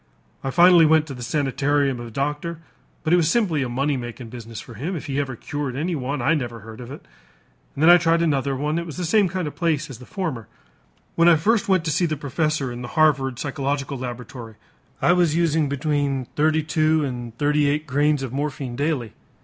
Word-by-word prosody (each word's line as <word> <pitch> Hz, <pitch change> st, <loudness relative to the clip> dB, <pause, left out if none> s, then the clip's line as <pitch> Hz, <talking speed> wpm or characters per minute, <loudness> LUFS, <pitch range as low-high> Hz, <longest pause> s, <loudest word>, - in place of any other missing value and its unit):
I 135 Hz, -, -2 dB
finally 170 Hz, +3 st, +6 dB
went 160 Hz, 0 st, +4 dB
to 145 Hz, -, -7 dB
the 125 Hz, -, -9 dB
sanitarium 140 Hz, 0 st, 0 dB
of 120 Hz, -, -7 dB
a -, -, -9 dB
doctor 150 Hz, +7 st, -3 dB, 0.5 s
but 160 Hz, -, +1 dB
it -, -, +6 dB
was 165 Hz, -3 st, +2 dB
simply 190 Hz, -11 st, +1 dB
a 130 Hz, -, -2 dB
money 140 Hz, +3 st, 0 dB
making 120 Hz, -1 st, -7 dB
business 115 Hz, -2 st, -8 dB
for -, -, -11 dB
him; 175 Hz, +8 st, -4 dB
if 155 Hz, -, -6 dB
he 140 Hz, -2 st, -2 dB
ever 135 Hz, -3 st, -2 dB
cured 145 Hz, +1 st, -4 dB
anyone, 145 Hz, -4 st, -2 dB
I 160 Hz, -, +3 dB
never 120 Hz, -7 st, -3 dB
heard 110 Hz, +2 st, -10 dB
of 120 Hz, -, -9 dB
it. 140 Hz, -, -10 dB, 0.7 s
I -, -, -3 dB
then 175 Hz, +2 st, +8 dB
tried 165 Hz, 0 st, +2 dB
another 140 Hz, -3 st, 0 dB
one; 150 Hz, +4 st, -1 dB
it 170 Hz, -, -5 dB
was 160 Hz, -, -8 dB
the 180 Hz, -, -2 dB
same 195 Hz, +2 st, +3 dB
kind 180 Hz, -2 st, -3 dB
of 150 Hz, -, -5 dB
a -, -, -29 dB
place 155 Hz, -4 st, 0 dB
as 120 Hz, -, -9 dB
the 125 Hz, -, -13 dB
former. 160 Hz, -, -4 dB, 0.7 s
When 170 Hz, +1 st, +5 dB
I 170 Hz, -, +7 dB
first 210 Hz, +7 st, +1 dB
went 185 Hz, -3 st, +3 dB
to 160 Hz, -, 0 dB
see 170 Hz, +4 st, +1 dB
the 155 Hz, -1 st, -2 dB
professor 145 Hz, -1 st, -1 dB
in 120 Hz, 0 st, -7 dB
the 120 Hz, -, -6 dB
Harvard 135 Hz, -5 st, +3 dB
Psychological 140 Hz, +1 st, -2 dB
Laboratory, 120 Hz, -2 st, -7 dB, 0.5 s
I 175 Hz, -, +5 dB
was 175 Hz, -4 st, +2 dB
using 160 Hz, -3 st, +2 dB
between 140 Hz, -2 st, -1 dB
thirty 155 Hz, +1 st, +2 dB
two 155 Hz, 0 st, +2 dB
and 120 Hz, -3 st, -6 dB
thirty 145 Hz, +1 st, +2 dB
eight 150 Hz, +2 st, -1 dB
grains 145 Hz, +1 st, +1 dB
of 130 Hz, -2 st, -5 dB
morphine 140 Hz, -3 st, -3 dB
daily. 140 Hz, -5 st, -2 dB
145 Hz, 220 wpm, -23 LUFS, 130-160 Hz, 0.7 s, then